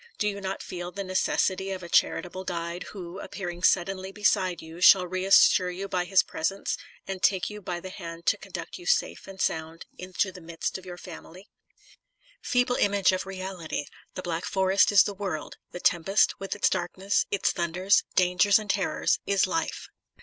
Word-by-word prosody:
Do 210 Hz, -, 0 dB
you 200 Hz, -1 st, -3 dB
not 190 Hz, 0 st, -4 dB
feel 175 Hz, -1 st, -6 dB
the 200 Hz, +2 st, -5 dB
necessity 185 Hz, 0 st, 0 dB
of 190 Hz, -2 st, -5 dB
a -, -, -7 dB
charitable 180 Hz, +2 st, +1 dB
guide, 170 Hz, -1 st, -4 dB
who, 185 Hz, -2 st, -8 dB
appearing 175 Hz, -4 st, -6 dB
suddenly 190 Hz, +1 st, +1 dB
beside 190 Hz, -3 st, +1 dB
you, 160 Hz, +2 st, -11 dB
shall 185 Hz, 0 st, +7 dB
reassure 185 Hz, 0 st, +4 dB
you 190 Hz, +2 st, -5 dB
by 180 Hz, -2 st, -1 dB
his 190 Hz, 0 st, +4 dB
presence, 195 Hz, +5 st, -2 dB, 0.3 s
and 190 Hz, -1 st, -5 dB
take 190 Hz, -1 st, +2 dB
>ou 210 Hz, 0 st, -8 dB
by 175 Hz, -2 st, -4 dB
the 185 Hz, +1 st, -8 dB
hand 170 Hz, -3 st, -8 dB
to 195 Hz, -, +3 dB
conduct 185 Hz, -4 st, -7 dB
you 175 Hz, -, -11 dB
safe -, -, 0 dB
and 195 Hz, 0 st, -11 dB
sound 160 Hz, -1 st, -2 dB
into 185 Hz, +1 st, -1 dB
the 185 Hz, -1 st, -12 dB
midst 165 Hz, +3 st, -4 dB
of 185 Hz, -, -15 dB
your 175 Hz, -1 st, -7 dB
family? 180 Hz, +2 st, -11 dB, 0.9 s
Feeble 245 Hz, -1 st, +1 dB
image 200 Hz, -2 st, +3 dB
of 185 Hz, 0 st, -2 dB
the -, -, -9 dB
reality! 185 Hz, -6 st, -5 dB, 0.3 s
The 185 Hz, -, -5 dB
Black 170 Hz, 0 st, -3 dB
Forest 190 Hz, +1 st, +3 dB
is 200 Hz, -1 st, +7 dB
the 205 Hz, -, -3 dB
world; 190 Hz, -7 st, -5 dB
the 180 Hz, -, -8 dB
tempest, 180 Hz, +4 st, +2 dB
with 195 Hz, +1 st, -4 dB
its 205 Hz, -, +2 dB
darkness, 190 Hz, +3 st, 0 dB
its 200 Hz, -, +1 dB
thunders, 180 Hz, +3 st, +2 dB
dangers 180 Hz, +2 st, +4 dB
and 210 Hz, -2 st, -1 dB
terrors, 195 Hz, -2 st, 0 dB
is 200 Hz, -1 st, +3 dB
.life. 330 Hz, 0 st, -3 dB
185 Hz, 185 wpm, -27 LUFS, 175-195 Hz, 0.9 s, shall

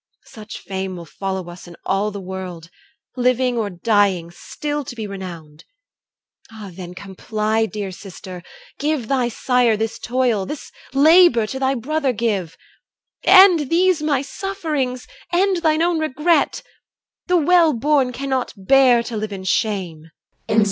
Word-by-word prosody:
Such 215 Hz, -1 st, -10 dB
fame 190 Hz, -1 st, -5 dB
will 170 Hz, -1 st, -8 dB
follow 190 Hz, +2 st, -5 dB
us 175 Hz, +1 st, -11 dB
in 170 Hz, -, -11 dB
all 200 Hz, +2 st, 0 dB
the 205 Hz, -1 st, -7 dB
world. 180 Hz, -3 st, -7 dB, 0.4 s
Living 250 Hz, 0 st, +1 dB
or 220 Hz, -3 st, -1 dB
dying, 190 Hz, -2 st, +1 dB
still 295 Hz, +10 st, -5 dB
to 265 Hz, -2 st, -8 dB
be 220 Hz, -2 st, -5 dB
renowned. 175 Hz, -6 st, -9 dB, 0.9 s
Ah, 215 Hz, -3 st, -9 dB
then, 180 Hz, 0 st, -9 dB
comply, 215 Hz, +3 st, -2 dB
dear 205 Hz, -3 st, -5 dB
sister; 185 Hz, -1 st, -10 dB, 0.4 s
give 290 Hz, -5 st, -1 dB
thy 255 Hz, -2 st, +1 dB
sire 245 Hz, -1 st, +2 dB
This 220 Hz, +1 st, -3 dB
toil 240 Hz, -6 st, 0 dB
this 300 Hz, -, -7 dB, 0.2 s
labour 290 Hz, -3 st, +5 dB
to 265 Hz, +5 st, -5 dB
thy 265 Hz, 0 st, +1 dB
brother 275 Hz, +2 st, -1 dB
give; 205 Hz, -7 st, -2 dB, 0.7 s
End 370 Hz, -7 st, +7 dB
these 355 Hz, -1 st, +3 dB
my 285 Hz, -3 st, 0 dB
sufferings, 300 Hz, -7 st, -3 dB, 0.3 s
end 375 Hz, +2 st, +2 dB
thine 320 Hz, -1 st, +2 dB
own 340 Hz, -1 st, +1 dB
regret: 315 Hz, +2 st, +1 dB, 0.6 s
The 360 Hz, 0 st, +3 dB
well 340 Hz, 0 st, +4 dB
born 270 Hz, 0 st, +1 dB
cannot 260 Hz, 0 st, -2 dB
bear 245 Hz, +4 st, +4 dB
to 235 Hz, -, -6 dB
live 215 Hz, 0 st, -3 dB
in 195 Hz, -1 st, -6 dB
shame. 185 Hz, -6 st, -2 dB
235 Hz, 140 wpm, -20 LUFS, 195-290 Hz, 0.9 s, End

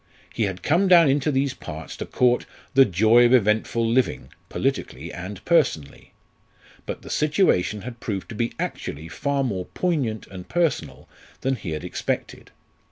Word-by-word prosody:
He 115 Hz, -, 0 dB
had 95 Hz, -2 st, -5 dB
come 175 Hz, +6 st, +3 dB
down 170 Hz, -3 st, +7 dB
into 145 Hz, +2 st, +1 dB
these 135 Hz, 0 st, 0 dB
parts 80 Hz, -7 st, -8 dB
to -, -, -5 dB
court 125 Hz, -1 st, +2 dB, 0.3 s
"the 135 Hz, 0 st, +7 dB
joy 110 Hz, +5 st, +5 dB
of 120 Hz, +1 st, +6 dB
eventful 110 Hz, +1 st, +2 dB
living" 115 Hz, -, 0 dB, 0.2 s
politically -, -, -3 dB
and 90 Hz, +2 st, -8 dB
personally. 135 Hz, -, 0 dB, 0.8 s
But -, -, -5 dB
the -, -, -10 dB
situation 145 Hz, -, +1 dB
had 120 Hz, -1 st, -8 dB
proved 100 Hz, -5 st, -4 dB
to 115 Hz, -, -7 dB
be 115 Hz, +2 st, -1 dB
actually 80 Hz, +3 st, -5 dB
far 140 Hz, -, -1 dB
more 95 Hz, -8 st, -2 dB
poignant 140 Hz, -, -2 dB
and 90 Hz, -2 st, -11 dB
personal 125 Hz, -, -1 dB, 0.3 s
than 135 Hz, 0 st, 0 dB
he 100 Hz, -7 st, -7 dB
had 75 Hz, -, -5 dB
expected. -, -, -4 dB
115 Hz, 160 wpm, -24 LUFS, 95-140 Hz, 0.8 s, down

